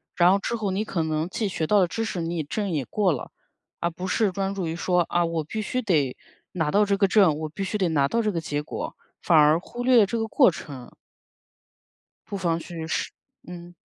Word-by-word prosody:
然 175 0 +5
后 195 - +4
之 215 - -3
后 210 -4 -2
你 195 +3 -1
可 170 -6 -1
能 155 0 -1
既 215 +3 -2
学 175 -4 -2
到 210 -1 +4
了 180 - +3
知 225 - -3
识 190 - -4
你 165 0 -2
证 200 +7 -3
也 150 -7 -1
过 200 -4 +1
了。 140 - -5 0.5
而 170 0 0
不 180 +3 -6
是 205 +1 +1
专 195 +1 -2
注 190 - -2
于 160 - -3
说， 180 +1 +1
啊， 175 0 +2
我 165 -2 -2
必 215 +8 -4
须 255 +4 -2
得 150 - +1 0.4
拿 160 -4 0
到 205 +5 +4
这 200 0 +1
个 195 0 +3
证， 185 -7 +4
我 155 -1 -4
必 195 +6 -5
须 205 +3 -2
得 190 -3 +1
拿 145 -4 +2
到 230 +10 0
这 215 -2 0
个 165 -3 -2
结 145 -2 -2
果， - - -6 0.3
反 165 - +4
而 150 +2 +5
忽 240 +6 -7
略 255 0 +5
了 205 - +6
这 230 +4 -3
个 225 - -1
过 250 +1 +5
程。 135 -6 -8 1.4
不 200 - -5
妨 170 -4 0
去 165 -1 -7
试， - - -2 0.4
嗯。 175 0 -10
180 Hz, 255 characters per minute, -25 LUFS, 160-205 Hz, 1.4 s, 了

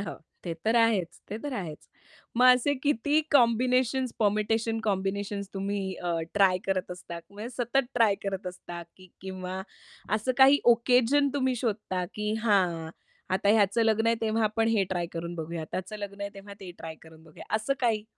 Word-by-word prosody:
हां, 200 - -5 0.3
ते 170 - -3
तर 225 +2 +2
आहेच. 225 -7 +2
ते 215 - -3
तर 290 - -4
आहेच. 165 -7 -6 0.5
मग 250 +1 +6
असे 285 +3 +1
किती 290 +2 +2
कॉम्बिनेशन्स, 250 0 +3
परमिटेशन-कॉम्बिनेशन्स 205 -2 0
तुम्ही 200 +1 -2
अ, 175 -1 -3 0.2
ट्राय 195 -3 +4
करत 185 -1 -1
असता? 180 -1 -7
म्हणजे 210 +3 -7
सतत 245 +2 +1
ट्राय 225 -4 +4
करत 195 -1 -3
असता 180 -1 -7
की 185 -1 -16
किंवा 185 0 -5 0.6
असं 225 +4 -1
काही 270 +2 +8
ऑकेजन 250 +4 +3
तुम्ही 260 -2 +1
शोधता, 210 -6 -2
की 210 0 -2
"हां, 175 -7 +2 0.4
आता 195 +2 +1
ह्याचं 210 +1 +4
लग्न 225 0 +2
आहे 230 - +4
तेव्हा 225 0 0
आपण 225 +1 +1
हे 220 -4 +2
ट्राय 175 -2 -2
करून 170 +1 -5
बघूया, 165 0 -5
त्याचं 190 +3 -4
लग्न 200 -1 -7
आहे 200 0 -3
तेव्हा 200 0 -10
ते 190 -2 -8
ट्राय 160 -1 -7
करून 160 0 -16
बघूया," 155 -2 -13
असं 220 +5 0
काही. 225 -4 +1
205 Hz, 170 wpm, -28 LUFS, 185-230 Hz, 0.6 s, काही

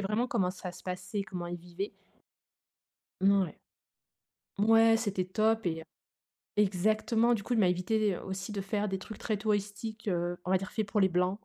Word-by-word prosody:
vraiment 210 +5 0
comment 195 -8 +1
ça 185 -1 -7
se - - -13
passait, 185 +2 -3
comment 180 -4 -5
ils 175 - -4
vivaient 175 +3 -6 1.3
mmh, 195 +1 +5
ouais. 175 - -5 1.0
Mouais 225 +2 +6
c'était 200 -5 -1
top 220 +2 +1
et, 160 -1 0
heu. - - -14 0.7
Exactement, 215 +4 +3
du 220 -4 0
coup 250 - -3
il - - +2
m'a 185 - +5
évité, 195 +3 +1
heu, - - -8
aussi 190 +2 -5
de 205 -1 -3
faire 205 +1 -1
des 190 - -2
trucs 210 +2 -9
très 215 - -1
touristiques, 210 +1 -2
heu, 175 -1 0
on 180 - -3
va 190 - +5
dire 190 0 -6
fait 220 - 0
pour 205 +1 -1
les 190 - +5
blancs, 180 +2 +1
200 Hz, 195 wpm, -31 LUFS, 185-215 Hz, 1.3 s, Mouais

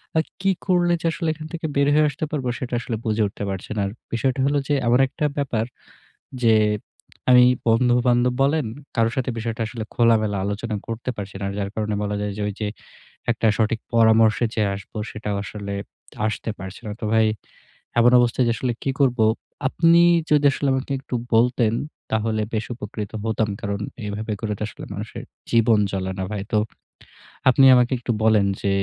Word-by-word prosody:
আর 160 - +3 0.2
কি 195 - +2 0.2
করলে 175 -2 +3
যে - - -6
আসলে 165 0 -3
এখান 155 0 -9
থেকে 165 -1 -4
বের 140 0 +3
হয়ে 155 +1 +5
আসতে 145 +2 -4
পারবো? 135 -4 -2
সেটা 125 -1 -5
আসলে 115 -1 -4
বুঝে 110 0 0
উঠতে 100 - -7
পারছি 95 -1 -5
না। 105 - 0
আর - - -5 0.2
বিষয়টা 125 +3 0
হলো 145 +1 +2
যে 145 - +1
এমন 120 +2 +4
একটা 150 +3 -3
ব্যাপার, 125 -6 0 0.8
যে 115 -1 +6 0.8
আমি 125 0 +8 0.2
বন্ধুবান্ধব 120 +1 +3
বলেন 145 +1 +2 0.3
কারো 115 -2 +3
সাথে 130 -1 -1
বিষয়টা 115 +1 -3
আসলে 115 0 -5
খোলামেলা 110 -4 +3
আলোচনা 105 +2 -3
করতে 115 +2 -4
পারছি 100 -1 -7
না। - - -2
যার 100 -1 -2
কারণে 105 -1 -1
বলা 105 0 -2
যায় 105 0 -2
যে, - - -3
ঐ - - -1
যে 105 - -1 0.6
একটা 115 -1 0
সঠিক 110 0 +1
পরামর্শে 110 0 +5
যে - - -1
আসব, 100 0 -10 0.2
সেটাও 105 -1 -4
আসলে 100 0 -6 0.5
আসতে 110 +1 -3
পারছে 95 0 -8
না। 105 - -4
তো - - -4
ভাই, 110 -1 +4 0.7
এমন 120 +1 +6
অবস্থায় 120 +1 +2
যে - - +3
আসলে 125 +2 -1
কী 135 - 0
করব? 130 -3 +3 0.5
আপনি 165 +4 +4 0.3
যদি 145 -1 +4 0.3
আমাকে 130 +1 -2
একটু 130 - -7 0.2
বলতেন, 115 -1 +3 0.4
তাহলে 110 0 0
বেশ 110 0 -1
উপকৃত 105 -2 -6
হতাম। 110 -1 0
কারণ 100 0 -2 0.3
এভাবে 105 +2 -4
করে 110 -2 -2
তো - - -5
আসলে - - -10
মানুষের 105 +2 -6 0.3
জীবন 115 -2 +4
চলে 95 -1 -2
না - - -1
ভাই। 100 -2 -3
তো 110 - +4 0.9
আপনি 135 +1 +5
আমাকে 125 +1 +3
একটু 120 0 -2
বলেন 110 -2 +4 0.2
যে, 100 - 0
115 Hz, 180 wpm, -23 LUFS, 105-125 Hz, 0.9 s, আমি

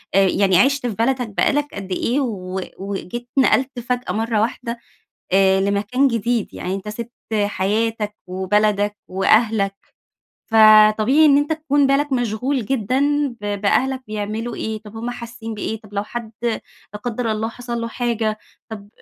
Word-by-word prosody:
آآ 195 -1 +5
يعني 190 -1 +3
عِشت 270 +3 +3
في 225 - -2
بلدك 245 +2 0
بقى 200 - +2
لك 290 0 0
قد 195 -1 -7
إيه، 240 +8 0
و 190 -7 -3 0.2
وجيت 200 +5 -6
نقلت 265 -1 +3
فجأة 245 +1 -2
مرة 225 0 0
واحدة 235 +1 -3 0.5
آآ 190 0 +4
لمكان 205 +7 +1
جديد، 230 -1 -1
يعني 185 +1 -3
أنت 195 +2 -6
سِبت 235 +3 -6 0.2
حياتك 210 +1 0
وبلدك 205 +2 +1
وأهلك، 195 +1 +2 0.8
فطبيعي 215 +6 +6
إن 280 -1 +6
أنت 290 +2 0
تكون 290 -3 +2
بالك 275 +1 +1
مشغول 245 +1 0
جدًا 270 +5 +1
ب 205 -1 -3
بأهلك 260 +6 +1
بيعملوا 215 +2 -4
إيه، 220 0 -3
طب 215 +1 -12
همُ 235 +2 -3
حاسين 235 -2 -7
بإيه، 215 +1 -4
طب 210 -1 -16
لو 200 - 0
حد 230 0 -6
لا 225 -2 -5
قدر 240 -1 -2
الله 220 +1 -2
حصل 235 0 -5
له 230 - -3
حاجة، 230 -3 -1 0.3
طب 205 -2 -9
225 Hz, 155 wpm, -20 LUFS, 205-245 Hz, 0.8 s, فطبيعي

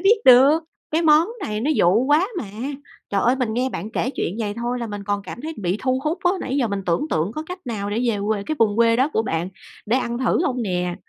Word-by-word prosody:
biết 395 +5 +5
được, 270 +5 +7 0.3
cái 320 +2 +1
món 315 +2 +5
này 210 0 -3
nó 290 +6 0
dụ 195 +8 +3
quá 300 +7 +3
mà. 265 - -4 0.7
Trời 200 -1 +1
ơi, 250 +3 +3
mình 240 -4 -1
nghe 250 +2 0
bạn 215 -4 -6
kể 245 +2 -1
chuyện 195 -6 -3
vầy 210 -3 -2
thôi 240 +2 -3
là 235 - -3
mình 205 -1 -6
còn 205 0 -1
cảm 200 - -8
thấy 315 +4 -5
bị 185 -1 -1
thu 255 0 +1
hút 310 +4 -1
á, 355 - +5
nãy 265 - -2
giờ 245 -5 +1
mình 200 -1 -3
tưởng 175 - +1
tượng 165 +7 0
có 310 - -4
cách 360 +1 -6
nào 205 -4 -3
để 215 +3 -1
về 210 - -2
quê 210 -2 0
cái 310 +8 -3
vùng 210 -2 +2
quê 230 0 +4
đó 270 +5 +2
của 220 - +1
bạn 170 -3 -2 0.4
để 235 +4 +2
ăn 235 -2 -2
thử 260 +7 +1
hông 250 -3 -1
nè? 180 -3 -1
235 Hz, 265 wpm, -22 LUFS, 205-275 Hz, 0.7 s, được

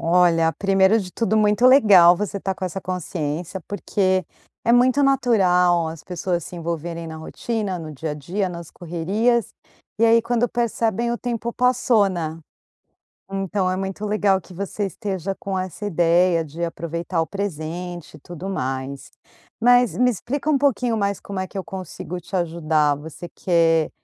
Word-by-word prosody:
Olha, 165 -1 +3
primeiro 195 +3 +3
de 185 -2 -7
tudo 220 -2 0
muito 210 +3 +4
legal 200 -10 +7
você 205 +1 -3
estar 195 -1 -2
com 185 - -5
essa 185 +2 -4
consciência, 175 -1 -4
porque 190 -2 0 0.4
é 235 - +3
muito 255 +3 +4
natural 185 -11 +3
as 160 -1 -9
pessoas 175 -1 -2
se - - -9
envolverem 170 0 -4
na 160 - -7
rotina, 195 +4 -3
no 155 -2 -7
dia 155 +2 -5
a - - -3
dia, 185 +7 -2
nas 170 -2 -8
correrias 195 +7 0 0.5
e 230 - +4
aí 230 0 +5
quando 240 +1 +1
percebem 235 -1 0
o 240 - -2
tempo 235 -1 -3
passou, 250 -4 +3
né. 165 -3 -4 0.9
Então, 195 0 -1
é 185 - 0
muito 195 +2 -4
legal 205 -2 +2
que 185 - -15
você 200 +2 -3
esteja 195 -1 -4
com 195 0 -4
essa 185 +2 -5
ideia 175 -2 +3
de 160 +3 -8
aproveitar 170 +1 -3
o 165 - 0
presente 175 -2 -5
e - - -16
tudo 175 +5 -8
mais. 135 -5 -4 0.5
Mas 245 0 +4
me 250 0 +4
explica 255 +6 -3
um 300 - +4
pouquinho 250 -4 +1
mais 200 -2 0
como 200 -2 -5
é 190 - -2
que - - -7
eu 190 - -4
consigo 180 -1 -7
te 185 +3 -5
ajudar. 160 -4 +1
Você 160 +3 -9
quer 165 -3 +2
185 Hz, 165 wpm, -22 LUFS, 170-215 Hz, 0.9 s, legal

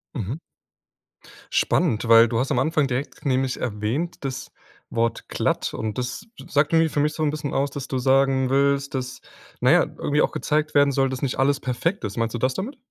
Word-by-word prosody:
Mhm. 120 +2 -3 1.1
Spannend, 120 -10 +1
weil 115 0 +7
du 115 0 -1
hast 130 - -1
am - - +2
Anfang 150 +1 +1
direkt 130 +4 -4
nämlich 130 -1 0
erwähnt 120 +9 -2
das 130 -2 -5 0.4
Wort 115 0 -1
glatt. - - -1
Und 110 -2 -4
das 125 +10 -4 0.2
sagt 145 +2 +1
irgendwie 165 0 +4
für 145 - -2
mich 150 +1 +1
so 155 - -3
'n 150 - +2
bisschen 150 -2 -4
aus, 140 +1 0
dass 140 -2 -6
du 130 - -2
sagen 135 0 +2
willst, 140 +1 +1
dass, 130 0 -4 0.4
na - - +4
ja, - - +6
irgendwie 150 +1 -1
auch - - +2
gezeigt 150 0 -1
werden 145 0 +5
soll, 135 0 +1
dass 130 -1 -5
nicht 135 -2 -2
alles 140 +1 +2
perfekt 140 +9 -2
ist. 100 -2 -5
Meinst 115 -1 -1
du - - -3
das 130 +2 +1
damit? 240 - -5
135 Hz, 205 wpm, -23 LUFS, 125-145 Hz, 1.1 s, weil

